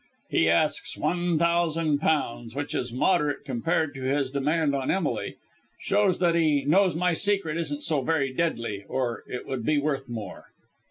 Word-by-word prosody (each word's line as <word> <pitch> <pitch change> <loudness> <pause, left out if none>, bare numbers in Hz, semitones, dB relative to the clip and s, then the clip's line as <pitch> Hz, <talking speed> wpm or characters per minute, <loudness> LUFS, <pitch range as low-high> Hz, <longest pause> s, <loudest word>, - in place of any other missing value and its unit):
He 80 - +3
asks 85 - +1
one 175 -1 0
thousand 165 -2 +1
pounds, 120 -6 -1
which 145 +1 -3
is 125 -1 -2
moderate 150 +2 +1
compared 145 +4 -1
with 130 -1 -6
his 135 -1 0
demand 145 +2 +1
on 135 -1 -2
Emily. 190 - -1 0.4
Shows 200 -2 +2
that 175 -2 +2
he 155 -4 +2
knows 180 +3 +3
my 180 +1 +1
secret 195 -3 +1
isn't 150 -3 -2
so 150 -3 +1
very 135 -2 0
deadly, 115 -10 -2
or 120 -4 -2
it 125 - -6
would 130 -3 -4
be 150 +6 +2
worth 140 -3 -1
more." 110 -6 -7
150 Hz, 165 wpm, -26 LUFS, 130-170 Hz, 0.4 s, He